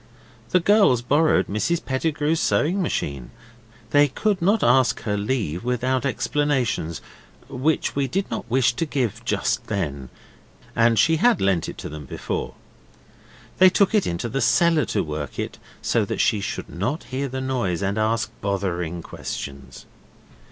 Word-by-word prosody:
The 180 - +4
girls 190 - +4
borrowed 150 +5 +3
Mrs 160 +12 -1
Pettigrew's 150 +3 0
sewing 180 +7 +1
machine; 70 - -3 0.6
they 145 0 +5
could 195 +7 -1
not 200 +4 +2
ask 125 +1 +3
her 105 -3 -1
leave 105 - -2
without 125 +2 0
explanations, 130 - -1 0.5
which 140 +4 0
we 140 -1 +1
did 190 +9 -1
not - - -4
wish 130 0 +3
to 165 - -1
give 120 -6 -2
just - - -1
then, 70 - -3 0.7
and 115 0 +4
she 160 +10 +4
had 240 +6 +3
lent 95 -4 +1
it - - -8
to - - -6
them 75 -1 -8
before. - - -4 1.0
They 185 0 +8
took 195 +2 +2
it 210 -3 +2
into 85 +7 -2
the 135 +4 -2
cellar 170 -5 +3
to 105 - -1
work 75 -2 -5
it, - - -4 0.2
so - - +2
that - - -4
she 110 -2 +2
should 100 - -4
not 105 - -3
hear 135 +2 -3
the 130 0 -5
noise 120 -10 -1
and 100 +2 -1
ask 115 +2 0
bothering 90 -4 -2
questions. 70 -1 -7
125 Hz, 155 wpm, -23 LUFS, 100-150 Hz, 1.0 s, They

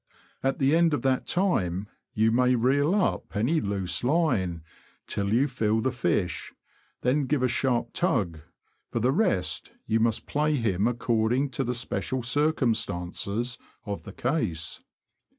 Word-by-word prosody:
At 135 0 0
the 140 +3 +3
end 165 -2 +4
of - - -5
that 130 -1 +1
time, 105 - 0 0.3
you 110 +1 +3
may 125 +2 +3
reel 140 - +2
up 205 - -1
any 130 +10 +1
loose 95 -3 -1
line, 115 - +1 0.4
till 100 0 -2
you 125 +6 +3
feel 110 -4 0
the 130 +4 0
fish, 90 -7 -1 0.5
then 135 +2 +1
give 140 -1 +1
a - - +4
sharp 120 -1 0
tug; 100 - 0 0.5
for - - -2
the 125 +3 +2
rest, 145 - 0
you 110 +1 +1
must 115 0 +1
play 150 +1 +1
him 110 -5 +1
according 120 +2 +1
to 135 - -1
the 125 0 -2
special 125 +1 -2
cir 145 +6 +3
cumstances 115 - -1 0.3
of 100 -2 -4
the 100 - -10
case. 110 - -1
120 Hz, 150 wpm, -27 LUFS, 105-140 Hz, 0.5 s, end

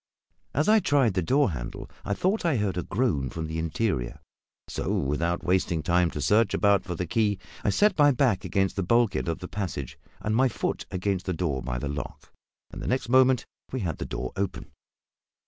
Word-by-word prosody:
As 150 +4 +2
I 220 +1 +6
tried 140 - +2
the 95 - +1
door 135 - +2
handle - - -6 0.2
I 100 - -1
thought 190 - 0
I 165 -7 +2
heard 105 -3 0
a 90 - -1
groan 95 - 0
from 80 +3 -4
the 80 +1 -4
interior; 80 - -1 0.5
so, - - -3
without 85 +5 0
wasting 90 -3 +1
time 90 -1 +3
to 75 - -5
search 105 +8 +3
about 100 -2 +3
for 90 - -4
the 90 - -2
key, 105 +2 +1 0.3
I - - +2
set 205 - +3
my 145 0 +7
back 130 -7 +2
against 95 0 0
the - - +1
bulkhead 115 0 +2
of 80 - -1
the 90 0 -7
passage 75 -9 -5 0.2
and 105 +1 -1
my 130 +3 +4
foot 120 - -3
against 95 0 -2
the 95 - 0
door 80 -6 -1
by - - -3
the 65 - -3
lock, 70 +1 -6 0.4
and - - -7
the - - -5
next 130 -2 -1
moment 130 0 +4 0.3
we 130 - -2
had 85 -6 -3
the - - -3
door 65 - -4
open. 100 -1 -3
95 Hz, 205 wpm, -27 LUFS, 80-120 Hz, 0.5 s, my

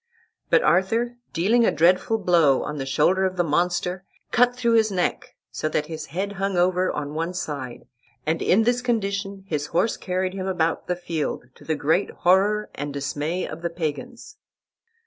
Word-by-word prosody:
But - - +4
Arthur, 230 +7 +2
dealing 220 +8 +3
a - - +4
dreadful 180 +7 +3
blow 170 -9 +3
on 150 -1 -5
the 135 - -4
shoulder 170 +8 +2
of 185 -1 -1
the 175 - +3
monster, 180 +3 0 0.3
cut 245 0 +4
through 235 -2 +1
his 220 -2 +4
neck 180 -2 -2 0.2
so 155 - -2
that 155 -1 -1
his 155 -1 -7
head 190 +8 -3
hung 195 -1 -2
over 180 +1 +2
on 145 0 -4
one 165 +3 -3
side, 140 -8 -5 0.4
and 160 +1 0
in 215 +5 +4
this 245 +2 +1
condition 200 -4 -2
his 150 -4 -2
horse 220 +7 0
carried 185 0 -2
him 190 -1 -4
about 165 -3 -1
the 180 - 0
field, 165 -7 -3
to - - -17
the 160 - -1
great 160 +7 +1
horror 200 +4 +2
and 145 +1 -5
dismay 145 +5 -2
of - - -8
the 170 - -1
Pagans. 230 - -5
180 Hz, 180 wpm, -24 LUFS, 160-200 Hz, 0.4 s, But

